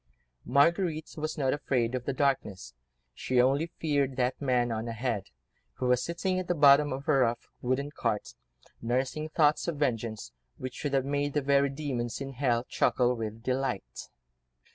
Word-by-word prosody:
Marguerite 160 +3 +2
was 155 0 -4
not 135 -3 +1
afraid 125 -5 0
of 125 -1 -3
the - - 0
darkness, 130 - -1 0.4
she 125 - 0
only 135 +6 +3
feared 140 -4 0
that 125 +1 -1
man, 125 -3 +1
on 110 +1 -3
ahead, 115 -3 -2 0.5
who 130 - -4
was 125 0 +3
sitting 185 +2 -1
at 185 - -5
the 175 - +1
bottom 145 0 +6
of 135 +1 -5
a 155 - +4
rough 120 -1 0
wooden 130 +3 -1
cart, 115 -7 -2 0.5
nursing 130 +6 -1
thoughts 150 -1 +2
of 170 -3 -2
vengeance, 115 - -2 0.3
which 130 -1 -7
would 145 -2 -2
have 135 -1 +1
made 145 0 -1
the 150 - +1
very 140 0 +3
demons 130 -5 -3
in 135 0 -5
hell 120 -3 +1
chuckle 125 -1 +2
with 110 0 -5
delight. 130 -5 -3
135 Hz, 165 wpm, -29 LUFS, 120-145 Hz, 0.5 s, bottom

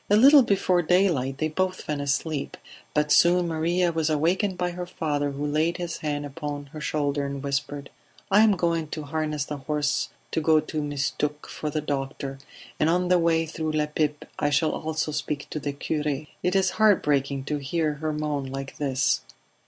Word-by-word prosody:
A 205 - +5
little 275 +6 +8
before 190 -5 +2
daylight 165 -7 +2
they 155 - 0
both 185 +4 -1
fell 150 -1 -3
asleep; 140 +1 -2 0.4
but 150 0 +2
soon 175 +3 +5
Maria 170 +2 +1
was 160 -1 0
awakened 180 +6 +1
by 180 0 -1
her 180 0 -5
father 145 -5 -1
who 140 +1 -4
laid 155 +3 +1
his 175 -2 -4
hand 145 -1 -3
upon 145 0 -5
her 155 - -7
shoulder 145 -2 0
and 140 0 -4
whispered: 140 0 -3 0.4
"I 205 +2 +7
am 220 -2 +6
going 165 -2 0
to 155 0 -5
harness 150 -1 -2
the 150 - -5
horse 150 +1 -1 0.2
to 160 - 0
go 155 0 +5
to 155 0 -3
Mistook 145 +1 -2
for 150 - -4
the 155 +1 -2
doctor, 135 -1 -4 0.4
and 155 - +3
on 180 +1 +1
the 180 -1 +5
way 165 -1 +2
through 155 0 -3
La 155 -1 +2
Pipe 150 -1 -1
I 145 - +2
shall 145 +2 +2
also 155 0 -2
speak 145 -1 -3
to 155 - -3
the 145 0 -3
cure. 150 0 -2 0.2
It 180 +1 0
is 190 -1 +3
heart 210 -3 +5
breaking 140 -2 0
to 150 +2 -2
hear 155 +2 -1
her 155 0 0
moan 150 -2 -2
like 135 0 -6
this." 135 -1 +1
150 Hz, 190 wpm, -26 LUFS, 145-170 Hz, 0.4 s, little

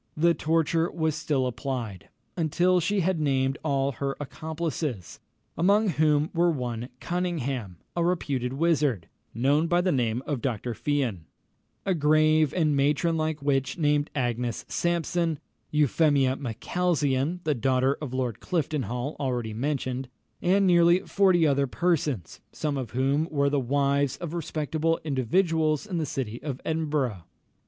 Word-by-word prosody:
The 170 +2 +4
torture 165 +2 +1
was 160 -2 -1
still 150 -3 0
applied, 120 - -4 0.3
until 175 +3 +2
she 200 +3 +1
had 180 -1 0
named 135 -2 +1
all 140 -2 +1
her 140 +2 -3
accomplices, 150 - -4 0.4
among 200 +5 +3
whom 150 -1 +2
were 175 0 +3
one 125 -5 -3
Cunningham, 140 - -3 0.2
a 170 - +1
reputed 140 -8 -1
wizard, 145 - +1 0.3
known 140 +7 +2
by 175 +1 +3
the 180 +1 +2
name 125 -3 0
of 140 -5 -2
Dr. 120 -1 -2
Fian; 125 - -1 0.6
a 190 - +2
grave 155 -1 +3
and 155 -5 +1
matron 150 +4 +2
like 155 -2 -2
witch, 135 -1 0
named 150 -2 +1
Agnes 120 -3 -2
Sampson; 170 -1 0 0.3
Euphemia 145 -2 +3
Macalzean, 145 +3 -1
the 155 - +1
daughter 130 +2 +1
of 145 -5 -5
Lord 125 -4 -2
Cliftonhall, 145 -5 -2
already 125 -5 -2
mentioned, 130 0 -2 0.3
and 195 +3 +3
nearly 175 0 +5
forty 185 -4 +3
other 140 -2 +2
persons, 145 - -1
some 150 -2 -2
of 130 -5 -3
whom 135 +5 +1
were 140 -2 +1
the 145 - +2
wives 140 +1 +1
of 170 -2 -6
respectable 160 0 -1
individuals 155 - +1
in 185 -5 -3
the 155 - -1
city 120 -4 -4
of 135 -4 -4
Edinburgh. 145 - -1
145 Hz, 140 wpm, -27 LUFS, 130-165 Hz, 0.6 s, nearly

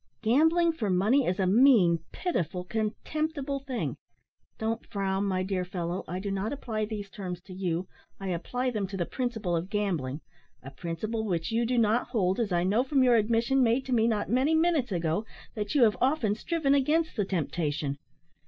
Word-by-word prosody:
Gambling 320 +9 +4
for 230 -11 -3
money 215 +9 +3
is 180 +2 0
a 190 - +2
mean, 200 -5 +5
pitiful, 180 - -2
contemptible 280 - -2
thing 265 -3 -4 0.6
don't 225 +1 -2
frown, 195 0 -1
my 185 -2 0
dear 185 -1 -1
fellow, 180 0 -4
I 180 - -4
do 200 +1 -3
not 195 +2 -2
apply 225 -6 -3
these 210 -2 -5
terms 185 -3 -6
to 185 0 -12
you, 180 -1 -2 0.3
I 195 -1 -4
apply 245 +9 -2
them 210 -4 -2
to 195 +1 -6
the 175 - 0
principle 225 -8 -2
of 170 +3 -2
gambling 170 -10 -2 0.4
a 135 - -8
principle 180 +10 -4
which 175 -5 -2
you 230 +1 +1
do 250 +1 0
not 230 +1 +2
hold, 190 -3 0
as 220 -4 0
I 175 -1 +2
know 205 +7 +2
from 270 0 +2
your 250 -1 +5
admission, 235 +4 +2
made 245 +2 +2
to 260 - -2
me 225 -1 +3
not 215 -3 0
many 265 +7 +2
minutes 320 -7 +2
ago, 170 +2 0 0.3
that 210 +3 -4
you 275 - +6
have 215 -2 +4
often 255 -6 +2
striven 285 +5 0
against 305 +4 +2
the 210 - +1
temptation. 155 -5 -2
215 Hz, 190 wpm, -28 LUFS, 185-255 Hz, 0.6 s, you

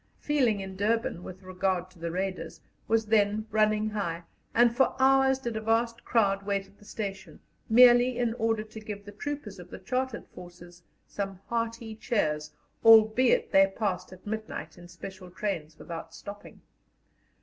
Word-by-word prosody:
Feeling 250 -9 +1
in 190 0 -7
Durban, 215 -2 0
with 185 +1 -10
regard 185 -1 -2
to 180 - -20
the 170 0 -3
Raiders, 185 +2 -4 0.3
was 225 0 +2
then 210 0 +2
running 215 0 +2
high, 175 -5 -3 0.3
and 235 0 +4
for 265 - +2
hours 265 0 +4
did 240 -4 -5
a 220 - -2
vast 230 +1 0
crowd 200 -4 +2
wait 200 -1 -1
at 195 +1 -24
the 205 - -18
station 195 -3 -6 0.3
merely 245 +1 +6
in 240 -2 0
order 225 -1 +1
to 220 0 -11
give 210 -2 -8
the 205 - -9
troopers 215 -3 -6
of 180 0 -11
the - - -8
Chartered 255 -1 -3
Forces 175 0 -13 0.2
some 195 -2 -5
hearty 230 -1 -3
cheers, 155 -10 -1 0.3
albeit 225 +2 +6
they 195 0 +6
passed 195 -3 -3
at 185 0 -14
midnight 210 -7 -5
in 175 0 -13
special 185 +2 -10
trains 170 -5 -4
without 165 -1 -8
stopping. 205 +3 -10
210 Hz, 160 wpm, -28 LUFS, 185-230 Hz, 0.3 s, merely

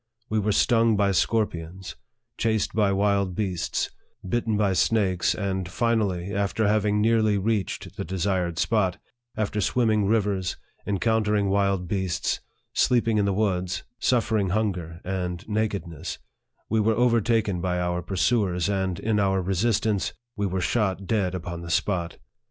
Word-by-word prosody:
We 110 - +2
were 105 +1 +1
stung 115 0 +3
by 100 -1 +3
scorpions, 95 -3 -1 0.4
chased 110 -2 0
by 105 -2 +2
wild 100 -2 +1
beasts, 95 -5 -1 0.4
bitten 115 0 0
by 100 -2 +2
snakes, 95 -3 +2
and 95 -3 -2
finally, 100 -4 0
after 100 +2 0
having 105 0 +2
nearly 110 -2 +3
reached 105 0 -2
the - - -2
desired 90 -2 -1
spot, 95 -2 +1 0.4
after 105 -1 -1
swimming 110 -1 +2
rivers, 100 -4 0 0.3
encountering 105 0 +1
wild 100 -2 +1
beasts, 95 -2 -1 0.3
sleeping 115 -3 +2
in 100 - +2
the 100 - +1
woods, 95 -3 -1 0.2
suffering 110 -5 +1
hunger 90 -5 -2
and 90 0 -3
nakedness, 100 -7 -3 0.5
we 110 - +1
were 110 +1 +2
overtaken 115 -5 +2
by 90 -1 0
our 90 0 -1
pursuers, 95 0 +1
and, 95 -2 -1
in 110 -1 0
our 95 -1 +2
resistance, 100 +2 0 0.2
we 100 -2 -1
were 95 0 -2
shot 100 -1 0
dead 95 -4 0
upon 85 -1 -5
the 85 - -7
spot 85 0 0
100 Hz, 140 wpm, -25 LUFS, 90-110 Hz, 0.5 s, stung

